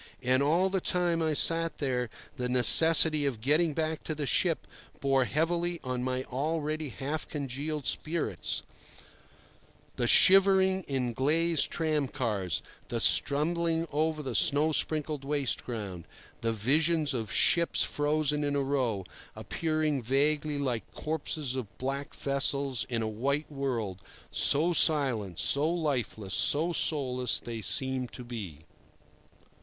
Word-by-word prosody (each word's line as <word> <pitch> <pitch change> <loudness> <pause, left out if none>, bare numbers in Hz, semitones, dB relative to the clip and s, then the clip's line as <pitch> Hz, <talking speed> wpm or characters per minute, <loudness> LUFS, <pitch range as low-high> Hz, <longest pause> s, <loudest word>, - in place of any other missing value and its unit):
And 130 +1 +2
all 170 +7 +1
the 190 -1 -1
time 175 -2 0
I 160 -1 0
sat 165 +2 +2
there 125 -4 -2 0.3
the 125 -2 -4
necessity 155 +4 +7
of 125 -6 -4
getting 150 +6 +1
back 160 -1 -2
to 155 - -3
the 150 -1 -4
ship 165 +5 0 0.3
bore 135 -2 +1
heavily 170 +4 -1
on 125 -1 -4
my 130 0 -2
already 155 +3 -3
half 145 +5 -5
congealed 145 +1 -5
spirits—the 155 -5 -5
shivering 190 +2 +5
in 130 -3 -2
glazed 160 +5 +1
tramcars, 130 - -2 0.2
the - - -3
stumbling 165 +3 +2
over 155 +1 -1
the 130 -3 -5
snow 145 +6 +4
sprinkled 150 -2 -1
waste 140 -2 -2
ground, 100 -8 -7 0.4
the 115 - -1
vision 155 +9 +1
of 110 -4 -4
ships 170 -1 +2
frozen 150 0 -1
in 145 0 -1
a 140 - 0
row, 125 -8 -2 0.3
appearing 155 -3 -2
vaguely 145 +4 0
like 130 -5 -3
corpses 150 -3 -3
of 110 -8 -7
black 135 +2 -5
vessels 140 -1 -1
in 115 -2 -2
a - - -2
white 140 +8 -3
world, 120 -9 -4 0.3
so 160 +5 +4
silent, 130 - +1
so 145 +3 +1
lifeless, 130 - -3
so 165 +4 +3
soulless 130 -7 0
they 115 -2 -7
seemed 130 +2 0
to 125 - -9
be. 105 -11 -8
145 Hz, 130 wpm, -28 LUFS, 125-155 Hz, 0.4 s, necessity